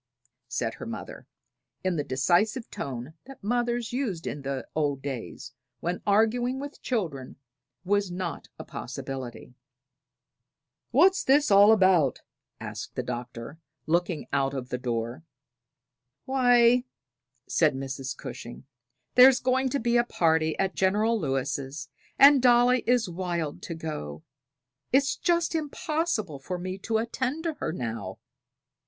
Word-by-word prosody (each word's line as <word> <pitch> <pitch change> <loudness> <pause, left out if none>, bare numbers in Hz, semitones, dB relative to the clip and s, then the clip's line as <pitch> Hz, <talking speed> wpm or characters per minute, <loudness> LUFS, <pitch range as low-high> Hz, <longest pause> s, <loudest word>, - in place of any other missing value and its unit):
said 115 -2 -2
her - - -8
mother, - - -8 0.6
in 185 -1 0
the 150 - -1
decisive 180 - +1
tone 130 +2 -6
that 270 -4 -13
mothers 240 +1 -1
used 220 -11 -2
in 145 - -4
the 135 -1 -4
old 145 -3 0
days, 130 -2 -6 0.3
when 175 +5 -3
arguing 235 +5 +2
with 285 +1 -8
children 165 - -3 0.5
was 200 0 +1
not 175 -2 -5
a - - -7
possibility. 130 -2 -7 1.4
"What's 380 +1 +4 0.3
all 200 +1 +8
this 220 - +7
about?" 185 - +3 0.4
asked - - -7
the - - -2
Doctor, 125 +3 -6 0.3
looking 170 -1 0
out 135 0 +1
of 125 -2 -5
the 125 - -3
door. 120 +3 -3 1.0
"Why," 245 -2 +4 0.6
said 155 -4 +2
Mrs. 135 -1 -5
Cushing, 120 +3 -8 0.5
"there's 255 +1 +8
going 260 +1 +1
to 280 - -1
be 235 0 +2
a 240 - +4
party 160 -7 +1
at 195 0 0
General 210 +4 +2
Lewis', 140 -1 -3 0.3
and 280 -1 +8
Dolly 245 0 +5
is 245 -3 +3
wild 170 -4 -3
to 165 - -6
go. 80 - -6 0.7
It's 275 +1 +3
just 340 -1 +1
impossible 300 - -2
for 180 +7 -4
me 185 +2 -5
to 220 +3 -1
attend 255 +6 -2
to 330 -2 -1
her - - -2
now." 115 - -5
180 Hz, 130 wpm, -27 LUFS, -, 1.4 s, all